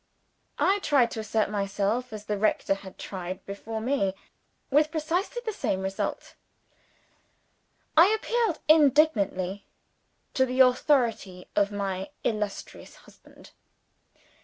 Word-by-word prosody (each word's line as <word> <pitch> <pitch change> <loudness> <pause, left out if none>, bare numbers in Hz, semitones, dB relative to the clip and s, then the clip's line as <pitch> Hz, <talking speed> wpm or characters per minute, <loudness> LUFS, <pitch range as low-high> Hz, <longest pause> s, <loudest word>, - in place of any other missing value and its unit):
I 395 +1 +2
tried 275 -10 +2
to - - -5
assert 215 -1 -1
myself 205 +4 -1
as 215 -1 -8
the 210 -1 -2
rector 215 -2 +1
had 195 -1 -10
tried 185 0 -6
before 220 +3 -6
me 220 -5 0 0.6
with 300 +2 +4
precisely 345 +10 -2
the 440 - -2
same 190 - -2
result. 190 0 -4 1.6
I 330 +3 +8
appealed 440 -3 0
indignantly 270 - +3 0.7
to 260 0 +2
the 255 +1 -3
authority 240 -8 +2
of 200 0 +2
my 195 -2 -3
illustrious 210 -3 -4
husband. - - -18
220 Hz, 110 wpm, -27 LUFS, 195-300 Hz, 1.6 s, I